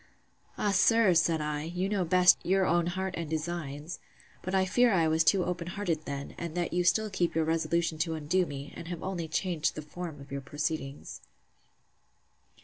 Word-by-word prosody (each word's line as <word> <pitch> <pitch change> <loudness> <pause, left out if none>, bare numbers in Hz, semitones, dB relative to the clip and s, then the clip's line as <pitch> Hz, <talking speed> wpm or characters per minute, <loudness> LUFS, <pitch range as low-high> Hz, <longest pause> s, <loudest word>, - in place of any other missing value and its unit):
Ah! 205 - +1
sir, 220 0 +4
said 165 -1 +2
I, 150 -1 -2
you 175 +4 -2
know 200 -2 0
best 180 +1 +5
your 190 +1 +2
own 170 -1 +2
heart 190 +1 -2
and 165 -3 -4
designs! 155 -1 -4 0.4
But 185 +1 -3
I 190 0 +3
fear 240 +6 +3
I 170 -5 +3
was 160 +1 +3
too 185 +2 +3
open 175 -1 -3
hearted 175 -5 -2
then; 140 0 -5
and 170 -1 -5
that 175 -1 -1
you 180 0 +2
still 215 +4 +2
keep 175 -4 0
your 160 -1 +2
resolution 165 0 0
to 160 0 0
undo 165 +4 0
me, 140 0 -7
and 165 - -8
have 175 -1 -6
only 180 -3 -3
changed 170 -2 -1
the 155 - -6
form 160 0 -7
of 140 -1 -13
your 140 0 -3
proceedings. 145 0 -4
170 Hz, 190 wpm, -29 LUFS, 155-185 Hz, 0.4 s, best